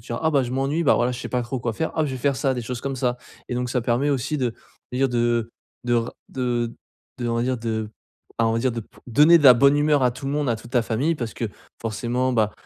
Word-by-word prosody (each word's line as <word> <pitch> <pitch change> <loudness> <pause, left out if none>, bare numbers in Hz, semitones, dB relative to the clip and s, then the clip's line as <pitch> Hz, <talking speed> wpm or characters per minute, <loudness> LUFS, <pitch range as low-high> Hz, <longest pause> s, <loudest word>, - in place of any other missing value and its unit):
te 120 - -18
diras: 120 - -3
«Ah 160 - +4
bah 140 -3 +3
je 120 - -4
m'ennuie, 135 +5 0
bah 145 - +4
voilà, 120 +1 +1
je 120 - -6
sais - - -5
pas 125 -1 -1
trop 120 +1 -4
quoi 115 -1 -1
faire. 160 +9 -2
Ah 160 - +1
je 140 - -2
vais 130 - -4
faire 140 +1 +1
ça!», 135 -2 +1
des 120 - -3
choses 125 +1 -5
comme 135 -1 -3
ça. 125 -1 0 0.3
Et 125 - -3
donc, 125 0 -2
ça 125 - +1
permet 125 +5 +1
aussi 140 +3 -1
de 125 -4 -1 0.4
de - - -3
dire, 135 0 +3
de 120 -1 0 0.3
de 120 -1 +1
ra 115 0 -1 0.2
de 120 -2 -1 0.5
de, 120 - -1
on 115 - 0
va 115 - +1
dire, 130 0 0
de 110 -2 -3 0.5
bah 115 - +3
on 115 - +2
va 115 - +1
dire 125 0 +1
de 115 - -3
p - - -17
donner 150 +8 +6
de 150 - -2
la 125 -2 +10
bonne 140 +4 +5
humeur 145 -1 +3
à 125 - +4
tout 125 +3 -8
le 140 - -1
monde, 145 -3 0
à 115 - +1
toute 115 +2 -13
ta 120 -2 +3
famille. 130 +9 0
Parce 120 -7 -5
que 115 - -3 0.4
forcément, 120 +3 -1
bah 110 -3 +2
125 Hz, 300 wpm, -23 LUFS, 115-135 Hz, 0.5 s, la